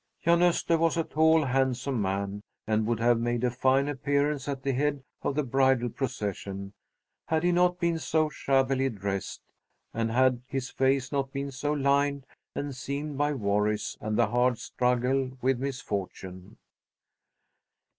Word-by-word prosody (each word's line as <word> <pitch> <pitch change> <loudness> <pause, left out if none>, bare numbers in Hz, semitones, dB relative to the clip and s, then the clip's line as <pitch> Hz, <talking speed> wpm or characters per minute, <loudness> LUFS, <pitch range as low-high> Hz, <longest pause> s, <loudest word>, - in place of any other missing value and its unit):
Jan 170 +1 +4
Öster 170 -1 +3
was 165 +1 +2
a 165 - +2
tall 160 +1 +3
handsome 130 -1 0
man, 100 +1 -2 0.2
and 110 0 +1
would 115 -1 0
have 120 0 +3
made 120 0 -1
a 125 - +2
fine 130 +3 +2
appearance 145 0 0
at 135 -2 -4
the 140 - +1
head 140 +1 0 0.2
of 140 - -1
the 150 - +1
bridal 130 -1 +2
procession, 100 -6 -4 0.5
had 160 0 +1
he 175 - +3
not 180 0 +2
been 170 -1 +1
so 155 -1 +1
shabbily 135 -2 +1
dressed, 100 -4 -4 0.5
and 115 0 -1
had 125 +1 +3
his 135 -2 -4
face 130 -1 +1
not 135 -2 -1
been 140 0 -4
so 140 +3 -2
lined 140 -1 +1 0.3
and 140 -2 -4
seamed 140 +3 -4
by 145 0 +2
worries 105 -3 0
and 110 0 -2
the 120 - +5
hard 125 +1 +2
struggle 130 +2 0
with 130 0 +1
misfortune. 100 -8 -5
130 Hz, 155 wpm, -28 LUFS, 120-145 Hz, 0.5 s, the